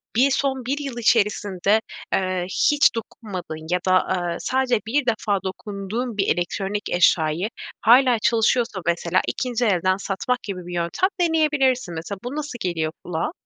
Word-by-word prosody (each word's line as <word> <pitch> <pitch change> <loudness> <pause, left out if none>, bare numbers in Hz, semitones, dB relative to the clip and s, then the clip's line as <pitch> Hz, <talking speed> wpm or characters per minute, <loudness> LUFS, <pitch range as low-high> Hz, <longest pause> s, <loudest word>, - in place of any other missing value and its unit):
bir 265 +4 +4
son 265 -2 0
1 275 +3 -1
yıl 275 -4 -5
içerisinde, 210 -2 +2 0.3
eee, 185 -1 0 0.3
hiç 295 -4 +4
dokunmadığın 185 -8 -6
ya 180 - +2
da, - - +4
aaa, 175 -2 -2
sadece 260 -3 +1
bir 275 +3 +1
defa 215 -4 0
dokunduğun 205 +4 -4
bir 195 - +1
elektronik 195 +4 -3
eşyayı, 175 +2 +2 0.3
hâlâ 245 +1 +5
çalışıyorsa 225 -2 +1
mesela 170 +1 +1
2'nci 245 -2 -1
elden 185 -2 +2
satmak 200 +6 -2
gibi 185 -3 -6
bir 180 - -6
yöntem 175 - 0
deneyebilirsin. 285 - +2
Mesela, 170 +5 -6
bu 245 +4 -5
nasıl 295 -4 -4
geliyor 165 -3 -1
kulağa? 170 - -2
210 Hz, 145 wpm, -23 LUFS, 180-250 Hz, 0.3 s, hâlâ